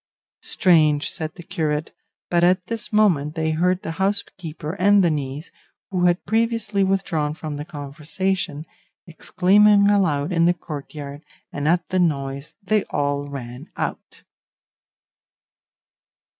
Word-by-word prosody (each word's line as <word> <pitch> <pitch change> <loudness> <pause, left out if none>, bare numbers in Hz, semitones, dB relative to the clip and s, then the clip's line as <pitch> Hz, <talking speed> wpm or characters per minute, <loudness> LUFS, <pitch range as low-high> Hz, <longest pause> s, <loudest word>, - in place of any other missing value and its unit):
"Strange," 155 -5 +3
said 160 -3 -3
the 175 - -10
curate; 155 -3 -2 0.4
but 175 -1 +3
at 180 +1 +3
this 230 +2 -3
moment 175 -9 +2
they 160 -1 0
heard 180 +3 +1
the - - -4
housekeeper 170 -5 -3
and 200 +1 +5
the 170 - +3
niece, 145 +1 -4 0.4
who 180 -2 +1
had 175 +1 +2
previously 225 -2 +1
withdrawn 175 -6 0
from 155 -2 -6
the 145 - -4
conversation, 150 +2 -3 0.4
exclaiming 200 +4 +4
aloud 175 -6 +1
in 170 -1 +3
the 175 +1 +3
courtyard, 145 -2 -8 0.3
and 145 +1 -2
at 175 +2 +2
the 185 - +1
noise 140 -4 -1
they 210 +2 +1
all 145 0 -1
ran 130 +1 -8
out. - - -5
165 Hz, 130 wpm, -22 LUFS, 150-190 Hz, 0.4 s, and